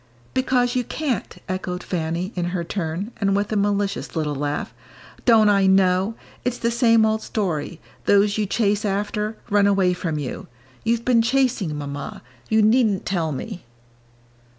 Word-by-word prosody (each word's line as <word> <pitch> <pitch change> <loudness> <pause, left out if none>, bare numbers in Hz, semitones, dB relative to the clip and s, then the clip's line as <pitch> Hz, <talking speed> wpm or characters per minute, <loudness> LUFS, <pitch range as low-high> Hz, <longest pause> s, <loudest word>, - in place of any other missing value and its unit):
"Because 255 -1 +1
you 250 - +1
can't," 265 -2 -3
echoed 185 -1 -3
Fanny, 170 +3 -2
in 175 -2 -1
her 175 0 -2
turn, 175 +4 -3
and 200 -3 +1
with 205 +1 -1
a - - 0
malicious 200 -1 -1
little 155 -2 -1
laugh. 145 +1 -3 0.5
"Don't 225 -3 +6
I 200 -2 +4
know? 190 +2 +3 0.3
it's 245 0 -1
the 235 - 0
same 230 -2 +4
old 220 0 +1
story 175 -7 -3 0.3
those 205 0 +4
you 215 -2 0
chase 210 0 +1
after, 210 +2 -2
run 205 -1 +4
away 195 -2 +3
from 170 -3 -3
you. 140 -4 -5 0.4
You've 230 +1 0
been 245 -2 +4
chasing, 235 - +1
Mamma; 145 -2 -6 0.3
you 220 0 +4
needn't 215 -3 +3
tell 170 -4 -1
me." 180 - -6
200 Hz, 155 wpm, -22 LUFS, 180-225 Hz, 0.5 s, Don't